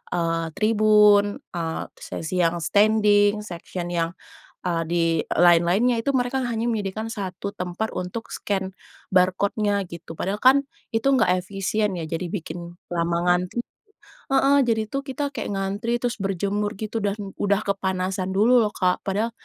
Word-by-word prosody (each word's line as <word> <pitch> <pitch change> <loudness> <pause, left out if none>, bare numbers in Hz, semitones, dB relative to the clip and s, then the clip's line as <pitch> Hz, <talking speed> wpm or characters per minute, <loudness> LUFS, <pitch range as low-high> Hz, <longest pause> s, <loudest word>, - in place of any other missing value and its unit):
eee, 165 -1 0
tribun, 210 -1 +4 0.2
eee, 165 -2 -3
terus - - -11
sesi 175 +3 -3
yang 170 +1 +1
standing, 210 +2 +3
section 175 -1 -6
yang, 170 -1 -1 0.5
eee, 170 -2 0
di, 170 -1 +2 0.2
eee, - - -4
lain-lainnya. 175 +8 +4
Itu 280 - 0
mereka 250 +2 -1
hanya 230 -1 -2
menyediakan 220 -1 -2
1 195 0 -5
tempat 180 +5 -3
untuk 180 +6 -4
scan 190 -2 -3 0.4
barcode-nya 200 +3 +2
gitu, 170 -1 -9
padahal 200 +3 -2
kan 270 +2 +6 0.3
itu 225 +2 -1
enggak 185 -8 +3
efisien 200 +1 -1
ya, 170 - -4
jadi 165 +3 -3
bikin 170 -2 -6 0.2
lama 170 0 0
ngantri 180 +6 +1 0.7
heeh 275 +1 +4
...jadi 220 -2 0
tuh 275 - -2
kita 285 +1 -3
kayak 225 -5 -3
ngantri, 200 +5 -1
terus 245 -1 -1
berjemur 200 +2 -1
gitu 220 +1 -3
dan 200 -1 0 0.2
udah 200 0 +2
kepanasan 190 -1 -1
dulu 230 +6 +5
loh 210 -1 -1
Kak. 180 -1 +1
Padahal 205 +4 0
200 Hz, 150 wpm, -24 LUFS, 180-220 Hz, 0.7 s, kan